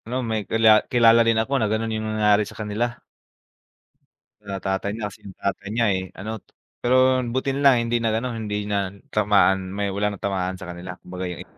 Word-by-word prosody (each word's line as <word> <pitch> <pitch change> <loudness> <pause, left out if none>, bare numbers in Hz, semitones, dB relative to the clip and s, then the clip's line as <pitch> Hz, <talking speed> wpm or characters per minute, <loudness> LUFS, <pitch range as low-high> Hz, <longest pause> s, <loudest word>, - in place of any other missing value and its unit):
Ano 125 +2 -2
may 110 -2 -3
kila 110 -1 +5
kilala 115 -1 +6
rin 115 -1 +3
ako 110 +5 0
na 110 - +1
ganun 110 +1 -1
yung 110 0 -3
nangyari 105 -1 +3
sa - - -13
kanila. 115 +3 -2 1.4
Sa 100 -2 -5
tatay 95 +1 -2
niya 110 - -3
kasi, 95 - -16
yung 95 -2 -12
tatay 100 0 -3
niya 115 +2 +1
eh 95 0 -2
ano, 110 +2 -6 0.4
pero 130 +1 +4
buti 130 +3 -1
na 140 - -3
lang 140 -2 +6
hindi 120 0 0
nag 110 -1 +1
ano 125 - -3
hindi 105 -2 -3
natamaan 100 -1 +1
may 100 0 -2
wala 100 0 -1
natamaan 95 -1 -2
sa 95 - -9
kanila 90 +1 -8
kumbaga 90 0 -5
eh. 90 - -7
105 Hz, 190 wpm, -23 LUFS, 100-115 Hz, 1.4 s, kilala